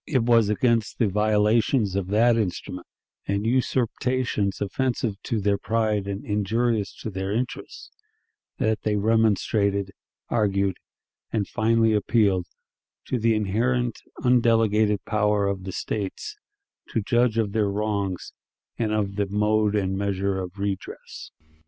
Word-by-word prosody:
It 130 Hz, -6 st, +1 dB
was 115 Hz, -3 st, +4 dB
against 115 Hz, +1 st, +1 dB
the 115 Hz, -, +2 dB
violations 105 Hz, +1 st, +2 dB
of 100 Hz, -2 st, -1 dB
that 115 Hz, +4 st, +4 dB
instrument, 90 Hz, -4 st, -3 dB, 0.4 s
and 100 Hz, +1 st, -1 dB
usurpations 125 Hz, -3 st, 0 dB
offensive 110 Hz, -1 st, -2 dB
to 115 Hz, -, -2 dB
their 100 Hz, 0 st, +1 dB
pride 110 Hz, -3 st, 0 dB
and 100 Hz, 0 st, -4 dB
injurious 105 Hz, +1 st, 0 dB
to 110 Hz, -, -4 dB
their 95 Hz, 0 st, -3 dB
interests, 120 Hz, +4 st, -4 dB, 0.7 s
that 110 Hz, -1 st, 0 dB
they 105 Hz, -1 st, 0 dB
remonstrated, 100 Hz, -2 st, +1 dB, 0.4 s
argued, 100 Hz, -4 st, +1 dB, 0.5 s
and 105 Hz, -3 st, -1 dB
finally 115 Hz, 0 st, +2 dB
appealed 100 Hz, -4 st, +2 dB, 0.6 s
to 125 Hz, -, 0 dB
the 115 Hz, 0 st, +2 dB
inherent, 115 Hz, +4 st, 0 dB, 0.2 s
undelegated 115 Hz, -4 st, +3 dB
power 105 Hz, -1 st, +1 dB
of 100 Hz, -1 st, -2 dB
the 95 Hz, -, -4 dB
States 105 Hz, -, -4 dB, 0.5 s
to 115 Hz, -, -1 dB
judge 120 Hz, +1 st, +2 dB
of 110 Hz, -3 st, +1 dB
their 105 Hz, -1 st, +1 dB
wrongs, 100 Hz, -2 st, -2 dB, 0.5 s
and 110 Hz, -2 st, 0 dB
of 100 Hz, -2 st, -1 dB
the 100 Hz, -1 st, 0 dB
"mode 105 Hz, +1 st, +1 dB
and 95 Hz, -2 st, 0 dB
measure 100 Hz, -1 st, -1 dB
of 90 Hz, +1 st, -6 dB
redress." 100 Hz, -1 st, -5 dB
105 Hz, 130 wpm, -25 LUFS, 100-115 Hz, 0.7 s, was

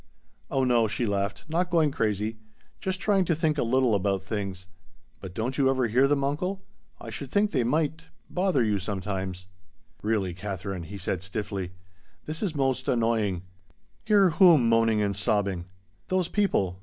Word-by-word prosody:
"Oh 135 Hz, -, +1 dB
no," 120 Hz, -3 st, +3 dB
she 115 Hz, +3 st, -1 dB
laughed, 100 Hz, -1 st, -1 dB
"not 175 Hz, +3 st, 0 dB
going 160 Hz, -4 st, +3 dB
crazy. 110 Hz, -2 st, -1 dB, 0.4 s
Just 190 Hz, 0 st, -3 dB
trying 195 Hz, +1 st, +2 dB
to 170 Hz, -, +1 dB
think 155 Hz, -1 st, 0 dB
a -, -, +2 dB
little 125 Hz, 0 st, +2 dB
about 100 Hz, -1 st, +1 dB
things. 95 Hz, -3 st, -4 dB, 0.5 s
But 95 Hz, -2 st, -9 dB
don't 125 Hz, +6 st, -2 dB
you 135 Hz, -1 st, +4 dB
ever 130 Hz, -2 st, +2 dB
hear 125 Hz, +5 st, +3 dB
them, 140 Hz, -1 st, +1 dB
uncle? 180 Hz, +8 st, -2 dB, 0.4 s
I -, -, -8 dB
should 140 Hz, -, -6 dB
think 205 Hz, +7 st, +2 dB
they 130 Hz, -5 st, +1 dB
might 155 Hz, +5 st, 0 dB, 0.2 s
bother 180 Hz, -8 st, +1 dB
you 105 Hz, -2 st, +1 dB
sometimes." 95 Hz, -1 st, -4 dB, 0.6 s
"Really, 105 Hz, -4 st, 0 dB
Katherine," 95 Hz, -1 st, -5 dB
he 100 Hz, +4 st, -8 dB
said 90 Hz, -1 st, -2 dB
stiffly, 95 Hz, -1 st, -4 dB, 0.5 s
"this 155 Hz, +1 st, -5 dB
is 190 Hz, -7 st, -1 dB
most 135 Hz, -2 st, 0 dB
annoying. 110 Hz, -6 st, +1 dB, 0.6 s
Hear 200 Hz, -4 st, +4 dB
whom 160 Hz, -, +6 dB
moaning 115 Hz, -2 st, +3 dB
and 100 Hz, -1 st, 0 dB
sobbing?" 100 Hz, -3 st, 0 dB, 0.4 s
"Those 185 Hz, -2 st, 0 dB
people! 95 Hz, -, +1 dB
115 Hz, 165 wpm, -27 LUFS, 100-155 Hz, 0.6 s, whom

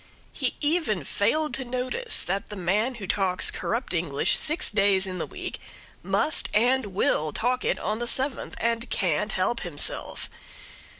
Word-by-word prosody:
He -, -, -1 dB
even 295 Hz, -, +1 dB
failed 300 Hz, -, 0 dB
to 270 Hz, -, 0 dB
notice 255 Hz, -, 0 dB
that 195 Hz, +3 st, -2 dB
the 210 Hz, -, -6 dB
man 205 Hz, +7 st, 0 dB
who 210 Hz, -4 st, -7 dB
talks 190 Hz, -1 st, +1 dB
corrupt 235 Hz, -1 st, -3 dB
English 160 Hz, -5 st, +1 dB
six 315 Hz, +4 st, +4 dB
days 200 Hz, -2 st, +3 dB
in 185 Hz, -1 st, -4 dB
the -, -, -3 dB
week -, -, -6 dB, 0.4 s
must 310 Hz, -, +1 dB
and 245 Hz, +2 st, +3 dB
will 170 Hz, -5 st, 0 dB
talk 250 Hz, -, 0 dB
it -, -, +1 dB
on 215 Hz, +1 st, -2 dB
the 240 Hz, -, -3 dB
seventh, 265 Hz, +2 st, 0 dB
and 230 Hz, +1 st, -1 dB
can't 185 Hz, +3 st, 0 dB
help 210 Hz, +5 st, 0 dB
himself. 165 Hz, -6 st, -3 dB
215 Hz, 160 wpm, -26 LUFS, 190-255 Hz, 0.4 s, six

